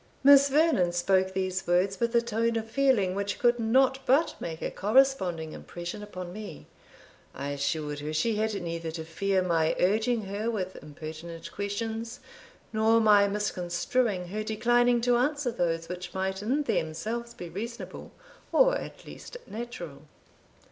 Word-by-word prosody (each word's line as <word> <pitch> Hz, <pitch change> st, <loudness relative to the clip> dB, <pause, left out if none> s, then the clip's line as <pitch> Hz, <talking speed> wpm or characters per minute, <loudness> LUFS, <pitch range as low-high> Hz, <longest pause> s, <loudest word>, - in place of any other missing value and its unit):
Miss 280 Hz, 0 st, +8 dB
Vernon 280 Hz, -, +3 dB
spoke 190 Hz, +2 st, +2 dB
these 190 Hz, 0 st, -2 dB
words 185 Hz, +3 st, +2 dB
with 235 Hz, 0 st, 0 dB
a 235 Hz, -, +4 dB
tone 230 Hz, 0 st, 0 dB
of 225 Hz, -1 st, -2 dB
feeling 230 Hz, -7 st, +2 dB
which 200 Hz, +1 st, -2 dB
could 240 Hz, -1 st, +3 dB
not 260 Hz, +4 st, +3 dB
but 280 Hz, +6 st, +3 dB
make 160 Hz, -1 st, -5 dB
a -, -, -2 dB
corresponding 195 Hz, -9 st, +2 dB
impression 175 Hz, +4 st, -7 dB
upon 185 Hz, -4 st, -7 dB
me. 205 Hz, -, -8 dB, 0.7 s
I 140 Hz, +2 st, -4 dB
assured 145 Hz, +1 st, -2 dB
her 150 Hz, +1 st, -4 dB
she 215 Hz, +9 st, +1 dB
had 215 Hz, -1 st, 0 dB
neither 170 Hz, -2 st, -4 dB
to 160 Hz, 0 st, -6 dB
fear 190 Hz, +3 st, 0 dB
my 165 Hz, -3 st, +1 dB
urging 220 Hz, +5 st, +2 dB
her 205 Hz, +3 st, -3 dB
with 190 Hz, -5 st, -3 dB
impertinent 160 Hz, +2 st, -8 dB
questions, 225 Hz, +3 st, -4 dB, 0.5 s
nor 220 Hz, +1 st, +4 dB
my 210 Hz, -2 st, +6 dB
misconstruing 195 Hz, 0 st, -1 dB
her 210 Hz, +3 st, -3 dB
declining 240 Hz, +2 st, +2 dB
to 245 Hz, 0 st, +3 dB
answer 285 Hz, 0 st, 0 dB
those 165 Hz, -6 st, -1 dB
which 180 Hz, 0 st, -7 dB
might 190 Hz, 0 st, -2 dB
in 265 Hz, +8 st, 0 dB
themselves 225 Hz, -, -2 dB
be 175 Hz, -, -8 dB
reasonable, 230 Hz, +7 st, -7 dB, 0.4 s
or -, -, +5 dB
at -, -, -7 dB
least -, -, -10 dB
natural. 195 Hz, -, -7 dB
205 Hz, 150 wpm, -28 LUFS, 175-235 Hz, 0.7 s, Miss